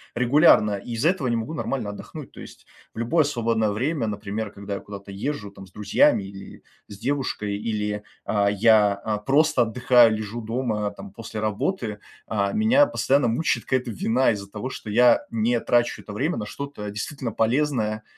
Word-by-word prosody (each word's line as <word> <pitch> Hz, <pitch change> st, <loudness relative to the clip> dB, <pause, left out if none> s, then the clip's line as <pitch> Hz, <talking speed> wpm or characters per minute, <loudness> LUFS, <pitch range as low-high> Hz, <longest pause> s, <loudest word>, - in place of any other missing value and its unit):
регулярно. 125 Hz, -4 st, +5 dB
И 115 Hz, +4 st, -7 dB
из-за 135 Hz, +9 st, +2 dB
этого 180 Hz, -8 st, -1 dB
не 120 Hz, -, +1 dB
могу 115 Hz, +8 st, -3 dB
нормально 125 Hz, -8 st, -3 dB
отдохнуть. 105 Hz, -, -9 dB
То -, -, -14 dB
есть -, -, -13 dB, 0.3 s
в -, -, -8 dB
любое 150 Hz, +8 st, +2 dB
свободное 115 Hz, -5 st, 0 dB
время, 130 Hz, +5 st, -1 dB
например, 105 Hz, 0 st, -4 dB
когда 100 Hz, 0 st, -6 dB
я -, -, -5 dB
куда-то 100 Hz, -1 st, -10 dB
езжу, 105 Hz, 0 st, -4 dB
там, 95 Hz, -1 st, -12 dB
с -, -, -22 dB
друзьями 100 Hz, 0 st, +3 dB
или 95 Hz, 0 st, -11 dB, 0.2 s
с 100 Hz, -, -11 dB
девушкой, 120 Hz, -7 st, -2 dB
или, 105 Hz, -1 st, -3 dB, 0.2 s
а, 100 Hz, -1 st, +2 dB
я, 105 Hz, -1 st, +4 dB
а, 105 Hz, +1 st, -3 dB
просто 135 Hz, +4 st, +3 dB
отдыхаю, 120 Hz, -1 st, +4 dB
лежу 110 Hz, +2 st, -5 dB
дома, 110 Hz, -2 st, -2 dB
там, 100 Hz, -1 st, -11 dB
после 110 Hz, +1 st, -7 dB
работы, 110 Hz, -, -2 dB, 0.3 s
а, 100 Hz, -2 st, -1 dB
меня 240 Hz, +7 st, +4 dB
постоянно 140 Hz, -, +1 dB
мучает 120 Hz, +8 st, 0 dB
какая-то 130 Hz, -2 st, -1 dB
вина 115 Hz, +4 st, +2 dB
из-за 100 Hz, -2 st, -5 dB
того, 105 Hz, +5 st, -5 dB
что 110 Hz, -, -8 dB
я 120 Hz, +3 st, +5 dB
не 115 Hz, +1 st, +1 dB
трачу 120 Hz, +1 st, +1 dB
это 105 Hz, -, -9 dB
время 145 Hz, +11 st, -1 dB
на 105 Hz, -, -3 dB
что-то 140 Hz, -5 st, -6 dB
действительно 115 Hz, +3 st, -4 dB
полезное, 115 Hz, -3 st, 0 dB
110 Hz, 180 wpm, -24 LUFS, 105-130 Hz, 0.3 s, регулярно